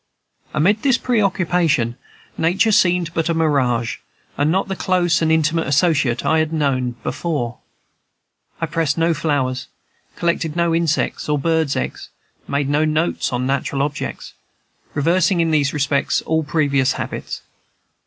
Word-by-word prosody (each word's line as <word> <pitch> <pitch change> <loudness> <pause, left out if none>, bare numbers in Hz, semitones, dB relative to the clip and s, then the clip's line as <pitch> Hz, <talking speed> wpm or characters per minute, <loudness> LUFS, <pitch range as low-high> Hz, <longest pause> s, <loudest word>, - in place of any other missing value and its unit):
Amid 190 +8 +2
this 265 -3 +3
preoccupation, 175 - +1 0.4
Nature 190 +7 +2
seemed 175 -4 +2
but 165 0 -1
a 165 - +1
mirage, 130 -7 +1 0.4
and 145 +2 +1
not 190 +3 +1
the 195 - -3
close 175 -3 +1
and 160 -1 +2
intimate 160 0 +1
associate 140 -4 +2
I 160 - +3
had 160 0 -1 0.5
before 155 -8 -2
known. 115 - -12 1.0
I - - +2
pressed 160 -2 -1
no 165 +1 +2
flowers, 140 -5 -1 0.5
collected 170 -2 -1
no 170 -1 +1
insects 165 -2 0
or 150 - +2
birds' 160 -1 +1
eggs, - - -4 0.4
made 140 0 -1
no 145 +2 +2
notes 155 +2 0
on 125 0 -1
natural 140 +1 -1
objects, 145 0 -5 0.6
reversing 170 +4 +2
in 165 -1 +2
these 145 -2 +2
respects 145 -1 0
all 160 0 +1
previous 140 -3 +1
habits. - - -5
160 Hz, 140 wpm, -20 LUFS, 140-170 Hz, 1.0 s, this